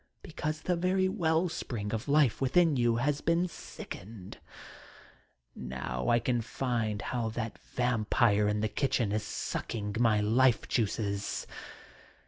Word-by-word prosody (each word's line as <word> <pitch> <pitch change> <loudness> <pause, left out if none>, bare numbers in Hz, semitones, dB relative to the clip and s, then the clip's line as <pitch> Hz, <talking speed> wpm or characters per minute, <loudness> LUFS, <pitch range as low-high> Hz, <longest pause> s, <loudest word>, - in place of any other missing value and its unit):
Because 155 -1 -4
the 180 - 0
very 185 +2 +2
well 175 -3 +1
spring 110 -10 -4
of 110 - -3
life 140 -4 +3
within 155 +4 +4
you 120 -2 +2
has 140 +4 0
been 170 +2 +2
sickened 100 - -9 1.1
Now 65 -1 -4
I 120 - +5
can 120 0 0
feel 115 -2 -2
how 120 -3 -2
that 115 -2 -4
vampire 115 -3 +1
in 105 0 0
the 110 - +1
kitchen 120 -2 0
is 105 +1 0
sucking 105 0 -4
my 115 -3 +4
life 115 +3 +3
juices 100 -3 -1
120 Hz, 130 wpm, -30 LUFS, 105-150 Hz, 1.1 s, I